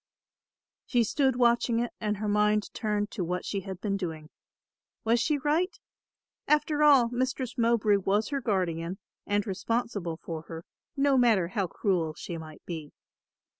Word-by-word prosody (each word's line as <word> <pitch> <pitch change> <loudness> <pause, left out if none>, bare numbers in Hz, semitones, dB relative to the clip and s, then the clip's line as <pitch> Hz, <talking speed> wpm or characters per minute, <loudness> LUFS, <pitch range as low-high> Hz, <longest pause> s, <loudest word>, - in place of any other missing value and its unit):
She 245 -2 +3
stood 265 +3 +1
watching 240 -1 +3
it 240 0 -2
and 210 -1 -1
her 210 +1 -3
mind 210 0 +2
turned 210 -2 -1
to 195 - -3
what 180 +2 -3
she 200 - -2
had 190 -2 -7
been 200 -1 -1
doing. 160 -5 -5 0.7
Was 230 +2 +3
she 290 +4 +1
right? 310 +7 0 0.7
After 300 0 +2
all 275 -6 +6
Mistress 255 0 -2
Mowbray 230 -4 +3
was 200 +3 0
her 280 -2 -2
guardian 180 -5 -1 0.3
and 205 0 +1
responsible 200 -3 -2
for 165 -1 -6
her, 165 0 -8 0.3
no 275 -1 +4
matter 215 -8 +3
how 195 -1 -1
cruel 170 -4 -1
she 170 - -6
might 155 -1 -11
be. 160 -4 -6
210 Hz, 155 wpm, -28 LUFS, 180-245 Hz, 0.7 s, all